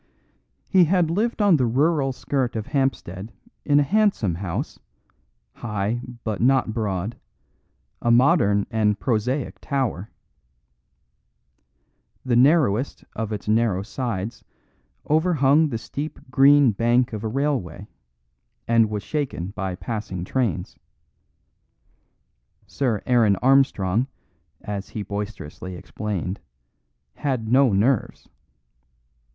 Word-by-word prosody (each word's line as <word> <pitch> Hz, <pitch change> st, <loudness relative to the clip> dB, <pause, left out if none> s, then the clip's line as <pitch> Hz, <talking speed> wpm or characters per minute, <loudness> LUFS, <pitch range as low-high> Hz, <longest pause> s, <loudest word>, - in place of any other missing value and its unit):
He 185 Hz, -3 st, +5 dB
had 170 Hz, -1 st, +2 dB
lived 215 Hz, +4 st, 0 dB
on 195 Hz, -5 st, +5 dB
the 125 Hz, -3 st, +1 dB
rural 140 Hz, +3 st, +2 dB
skirt 130 Hz, -1 st, -2 dB
of 110 Hz, -2 st, -3 dB
Hampstead 115 Hz, -, -2 dB, 0.3 s
in 145 Hz, -1 st, +3 dB
a -, -, +4 dB
handsome 195 Hz, -, +1 dB
house, 85 Hz, 0 st, -4 dB, 0.7 s
high 110 Hz, +1 st, -3 dB, 0.2 s
but 110 Hz, -3 st, -3 dB
not 130 Hz, -2 st, +3 dB
broad, 105 Hz, -1 st, -3 dB, 0.8 s
a 120 Hz, -, 0 dB
modern 120 Hz, -, +4 dB
and 105 Hz, -2 st, +1 dB
prosaic 125 Hz, +3 st, -1 dB
tower. 125 Hz, -8 st, -2 dB, 2.2 s
The 125 Hz, -2 st, +1 dB
narrowest 135 Hz, -2 st, +3 dB
of 110 Hz, 0 st, -3 dB
its 105 Hz, -1 st, -5 dB
narrow 110 Hz, -3 st, +2 dB
sides 115 Hz, -2 st, -4 dB, 0.6 s
overhung 155 Hz, -2 st, +3 dB
the 115 Hz, -, -2 dB
steep 145 Hz, +6 st, -6 dB
green 140 Hz, -1 st, +6 dB
bank 120 Hz, +3 st, +1 dB
of 105 Hz, 0 st, -5 dB
a -, -, -1 dB
railway, 110 Hz, -, -2 dB, 0.8 s
and 115 Hz, -2 st, +4 dB
was 105 Hz, -1 st, -4 dB
shaken 135 Hz, -, -3 dB
by 95 Hz, -2 st, -4 dB
passing 105 Hz, -4 st, -5 dB
trains. 115 Hz, -, -2 dB, 1.9 s
Sir 120 Hz, -7 st, -2 dB
Aaron 115 Hz, -5 st, +4 dB
Armstrong, 125 Hz, -3 st, +2 dB, 0.5 s
as 100 Hz, -1 st, -5 dB
he 105 Hz, -, -5 dB
boisterously 100 Hz, -4 st, -6 dB
explained, 100 Hz, 0 st, -4 dB, 0.7 s
had 125 Hz, -6 st, -2 dB
no 130 Hz, -1 st, +5 dB
nerves. 110 Hz, +5 st, 0 dB
115 Hz, 105 wpm, -23 LUFS, 105-140 Hz, 2.2 s, green